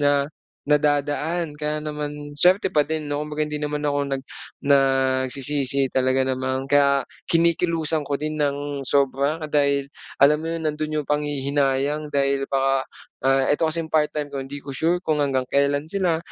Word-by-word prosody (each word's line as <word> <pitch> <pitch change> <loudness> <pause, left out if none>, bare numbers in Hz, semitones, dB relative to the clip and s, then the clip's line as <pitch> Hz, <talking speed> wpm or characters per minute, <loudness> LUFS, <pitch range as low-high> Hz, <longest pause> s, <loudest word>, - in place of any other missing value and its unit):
na 145 0 +2 0.4
na 150 0 +3
dadaan 150 +3 0
kaya 150 0 -2
naman 150 -1 -4 0.2
suwerte 185 +5 +3
pa 150 - +5
din, 155 0 -3
'no? 145 0 -2
Kumbaga, 150 0 -2
hindi 150 - -6
naman 150 0 -2
ako 145 0 +1 0.2
nag - - -10 0.4
nagsisisi 135 0 +2
talaga 130 0 +2
namang 130 0 -2
ka 140 0 +3 0.2
kinikilusan 165 -2 +1
ko 140 0 -2
din 155 +1 -3
ng 145 -1 -2
sobra 140 +3 +1
dahil 140 -2 +1 0.3
alam 150 +3 +5
mo 165 - -3
'yon, 165 -1 -3
nandun 155 0 -2
'yung 150 - -3
panghihinayang 145 0 0
dahil 140 -1 0
baka, 135 0 +2 0.4
ah, 135 0 +3
ito 150 - +1
kasing 165 0 -3
part-time 150 -1 0
ko, 140 -1 -5
hindi 140 +2 -7
ko 140 -1 -8
sure 170 +4 +1
kung 150 -2 +2
hanggang 130 -2 0
kailan 140 +2 +1
sila, 175 -2 0
145 Hz, 160 wpm, -23 LUFS, 140-150 Hz, 0.4 s, pa